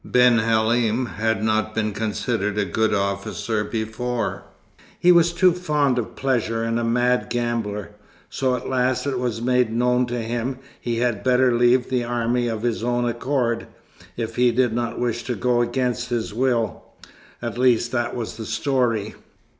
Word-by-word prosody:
Ben 125 -2 +4
Halim 115 +2 +2
had 110 -1 -1
not 110 0 0
been 110 -1 0
considered 105 0 -2
a 105 - +1
good 110 +5 0
officer 100 +2 -1
before. 115 +2 -3 0.5
He 180 +1 +6
was 170 -1 +5
too 185 +1 +4
fond 150 -7 +1
of 115 - -5
pleasure, 115 -4 0
and 115 +1 0
a - - -1
mad 125 +2 +1
gambler; 115 -4 -2 0.4
so 130 -2 0
at 125 - -6
last 130 0 0
it 135 -3 -1
was 120 -2 -2
made 125 -2 +2
known 125 +2 +2
to 120 0 -3
him 120 +3 -3 0.2
he 120 -1 -2
had 120 -3 0
better 125 -1 +3
leave 120 +1 +3
the 125 -2 +1
army 120 0 0
of 110 -1 -3
his 120 -2 -1
own 120 0 0
accord 120 -1 -1 0.5
if 115 -1 -4
he 125 0 +4
did 120 -1 +1
not 120 0 -2
wish 120 -1 -1
to 125 - -2
go 120 +3 +1
against 125 0 -1
his 120 -4 -2
will; 120 -3 0 0.6
at 120 0 -5
least, 120 -2 +3
that 120 -2 -1
was 115 -2 -5
the 110 - -6
story." 115 -3 0
120 Hz, 170 wpm, -23 LUFS, 110-125 Hz, 0.6 s, He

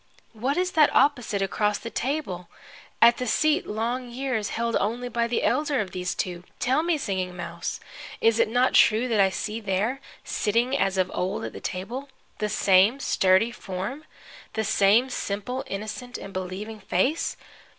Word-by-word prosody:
What 255 +7 -1
is 365 0 +1
that 305 -2 +5
opposite, 245 -8 +2
across 210 +2 0
the 230 - -7
table, 235 - -3 0.5
at 235 0 +7
the 250 - -3
seat 310 +8 +2
long 240 +4 -2
years 245 -4 -2
held 230 0 -1
only 240 +4 -2
by 235 0 0
the 235 - -1
elder 295 -2 +1
of 195 -4 -2
these 180 +1 -3
two? 175 -1 -3
Tell 260 +4 +2
me, 335 -1 +1
Singing 185 -8 -3
Mouse, 170 -1 -5 0.4
is 225 0 +3
it - - +3
not 245 +3 +2
true 225 +3 +5
that 225 -4 +1
I 195 -1 +5
see 210 +5 -4
there, 215 +6 -1 0.2
sitting 235 +5 0
as 195 -8 +1
of 185 -1 +1
old 190 +3 -2
at - - -6
the - - -9
table, 240 +9 -5 0.3
the 210 - -1
same 200 +6 +4
sturdy 190 -1 +3
form, 195 +8 -5 0.5
the 220 - -1
same 210 +4 +4
simple, 245 +5 -3
innocent 215 +4 -5
and 195 - -9
believing 190 +4 -5
face? 255 - 0
220 Hz, 170 wpm, -25 LUFS, 195-255 Hz, 0.5 s, at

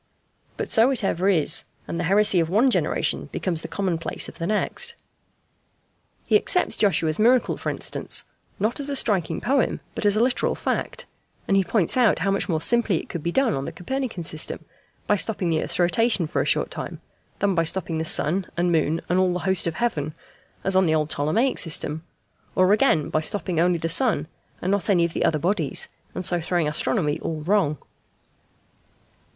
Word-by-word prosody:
But - - -4
so 225 +3 +5
it 265 -5 -1
ever 190 0 +1
is, 160 -4 +2 0.2
and 170 - -4
the 170 - -1
heresy 200 +1 +4
of 165 -1 0
one 230 +8 +3
generation - - 0
becomes 170 -4 -2
the - - -6
commonplace 180 -5 -2
of - - -12
the 165 - -2
next. 465 - 0 1.3
He - - +2
accepts 360 - 0
Joshua's 165 -6 +1
miracle, 245 +3 +3
for - - -4
instance, - - -2 0.3
not 215 +7 0
as 285 0 -4
a 280 - -1
striking 190 -10 +2
poem, 270 -1 0
but 210 - 0
as 205 - +3
a 225 - +4
literal 255 +1 0
fact; - - -3 0.4
and 195 - +2
he 195 - +4
points 190 +2 0
out 240 -5 +4
how 195 +4 0
much 195 - -1
more 160 -3 +1
simply 225 0 +2
it - - -7
could 170 - -5
be 170 - -2
done 265 0 +2
on 135 - -3
the - - -5
Copernican 250 -2 -4
system 155 -1 -2 0.4
by 210 - +3
stopping 200 -3 -1
the 160 - +1
earth's - - -2
rotation 200 +2 +2
for 155 - -1
a - - -1
short - - +1
time, - - -6 0.4
than 200 -1 +1
by 170 - +2
stopping 165 -1 -2
the - - -1
sun 170 +3 +2
and 175 0 +1
moon 160 0 +1
and 180 +2 +1
all 185 -1 +2
the 180 - -3
host 190 -2 +3
of 165 - -2
heaven 155 -10 -2 0.5
as 195 0 +1
on 190 -1 +4
the 160 - +2
old 155 0 -1
Ptolemaic 215 - +1
system, 160 -1 0 0.5
or 185 +2 +4
again 210 - +2
by 155 - +2
stopping 180 0 -2
only 175 +1 +3
the 165 - -3
sun 185 - +2 0.4
and 185 - 0
not 200 +1 -1
any 175 -4 +4
of 170 - -4
the - - -1
other 155 - +2
bodies, 170 -1 0 0.3
and 185 - -4
so 175 0 +2
throwing 170 -1 0
astronomy 150 0 0
all 160 -2 -4
wrong. 175 -5 +1
180 Hz, 200 wpm, -23 LUFS, 165-210 Hz, 1.3 s, so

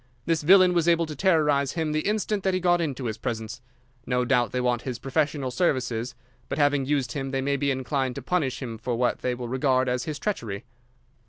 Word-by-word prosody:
This 165 -2 +1
villain 185 +3 +6
was 170 -1 +1
able 170 -1 +4
to 155 -1 -7
terrorise 150 -5 +2
him 160 -2 -1
the 155 +3 -1
instant 210 -1 -1
that 190 -1 +1
he - - +1
got 175 -1 +3
into 135 -5 -3
his 110 -1 -3
presence. 115 -2 -4 0.5
No 125 -1 +1
doubt 120 -3 +2
they 125 - -1
want 125 -1 +1
his 125 -2 -4
professional 140 -1 -1
services, 125 -6 -1 0.3
but, - - -3
having 145 -2 +2
used 135 -5 0
him, 135 +1 -3
they 135 0 -1
may 140 +1 0
be 140 +1 0
inclined 130 -1 -1
to 140 - -6
punish 135 -6 -1
him 115 -3 -6
for 120 +2 -2
what 120 +1 0
they 125 -1 -1
will 120 0 -6
regard 130 +1 +1
as 125 0 -1
his 155 -2 -4
treachery." 115 - -3
135 Hz, 220 wpm, -26 LUFS, 125-155 Hz, 0.5 s, villain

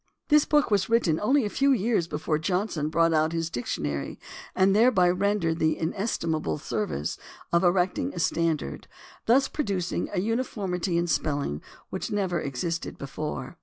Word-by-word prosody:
This 300 -1 +5
book 295 -5 +2
was 200 0 +2
written 185 -9 +2
only 260 +3 +2
a - - 0
few 275 0 +3
years 220 -7 +1
before 155 0 -1
Johnson 180 -3 -1
brought 165 +1 +3
out 155 +1 +2
his 165 0 -2
dic 120 -3 -4
tionary 70 -1 -3 0.4
and 190 +1 +4
thereby 215 -5 +5
rendered 180 -3 0
the 155 0 +2
inestimable 160 - -1
service 70 +2 -3 0.3
of 170 +2 +4
erecting 180 0 +2
a - - -4
standard, 160 - -1 0.4
thus 265 +4 +5
producing 195 - -2
a - - -1
uniformity 195 -5 -1
in 170 - +1
spelling 145 - -1 0.3
which - - -3
never 190 -5 -1
existed 165 +5 -3
before. 150 +4 -5
175 Hz, 155 wpm, -26 LUFS, 155-205 Hz, 0.4 s, This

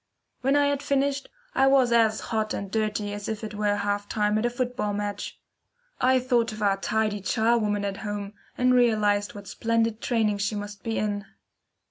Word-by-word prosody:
When 270 +2 +2
I 290 0 +4
had 285 -1 0
finished, 280 0 0 0.2
I 270 - +4
was 265 -3 +4
as 225 -2 +3
hot 215 -1 0
and 195 -1 -5
dirty 210 -1 -1
as 205 0 -5
if 220 0 -4
it 215 - -5
were 205 0 +1
half 205 0 -2
time 210 0 +1
at 235 - +1
a - - 0
football 245 -3 -2
match. 205 0 -4 0.6
I 260 +1 +4
thought 245 -2 +1
of 215 -1 -5
our 195 -1 +3
tidy 215 +1 0
charwoman 215 0 +1
at 200 -1 -3
home, 205 -1 -5 0.2
and 250 0 +3
realised 210 -5 +2
what 200 -1 -9
splendid 230 0 0
training 220 -4 +1
she 205 +1 -1
must 205 -1 -6
be 225 -1 -2
in. 205 -1 -1
215 Hz, 185 wpm, -26 LUFS, 205-240 Hz, 0.6 s, I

